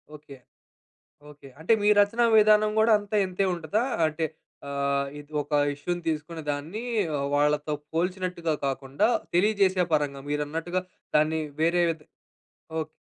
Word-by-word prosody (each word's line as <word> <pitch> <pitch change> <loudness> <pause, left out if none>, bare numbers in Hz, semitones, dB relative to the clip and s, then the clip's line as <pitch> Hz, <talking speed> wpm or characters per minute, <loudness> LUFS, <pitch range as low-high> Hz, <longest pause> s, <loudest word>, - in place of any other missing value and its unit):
Okay. 145 -2 -13 1.0
Okay. 140 -2 -14
అంటే 175 +8 +2
మీ 205 - +3
రచనా 230 +4 +2
విధానం 215 0 +5
గూడా, 220 +1 +5
అంతే 205 +1 -4
ఇంతే 185 +2 -1
ఉంటదా? 175 +7 -1 0.2
అంటే, 155 +1 -2 0.4
అహ్, 140 0 0
ఇది 145 +1 -13
ఒక 145 - -16 0.2
ఇష్యూ‌ని 175 +4 -4
తీసుకుని 160 +1 -3
దాన్ని 160 +10 -4 0.4
ఆహ్, 140 - -1
వాళ్ళతో 150 +1 +1 0.2
పోల్చినట్టుగా 180 -1 -1
కాకుండా, 135 - 0 0.3
తెలియజేసే 190 -1 +3
పరంగా 140 -2 -1
మీరన్నట్టుగా 165 +5 -2 0.3
దాన్ని 155 +1 +2 0.2
వేరే 175 +1 +3
విధ 160 -2 -5 0.8
ఓకే. 155 - -4
160 Hz, 130 wpm, -26 LUFS, 145-185 Hz, 1.0 s, విధానం